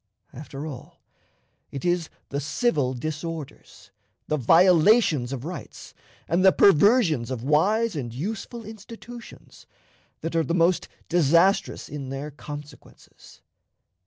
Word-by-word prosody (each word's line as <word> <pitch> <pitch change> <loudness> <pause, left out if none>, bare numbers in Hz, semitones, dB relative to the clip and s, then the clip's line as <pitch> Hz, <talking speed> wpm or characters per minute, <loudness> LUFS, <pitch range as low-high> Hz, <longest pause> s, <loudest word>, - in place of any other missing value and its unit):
After 140 +1 -8
all, 140 -6 -9 0.7
it 140 - -7
is 175 -2 0 0.2
the 140 - -2
civil 145 - 0
disorders, 150 - -7 0.4
the 155 - 0
violations 165 - +4
of 135 -1 -5
rights, 175 +2 -8 0.3
and 170 +4 +1
the 190 - +7
perversions 195 - +4
of 125 -3 -4
wise 205 - +2
and 125 -6 -4
useful 215 - -6
institutions, 230 +3 -12 0.5
that 165 +1 -4
are 165 - +3
the 165 +4 -1
most 175 +1 +2 0.2
disastrous 170 +3 +2
in 140 -3 -7
their 135 +3 -5
consequences. 145 0 -12
160 Hz, 115 wpm, -25 LUFS, 140-190 Hz, 0.7 s, the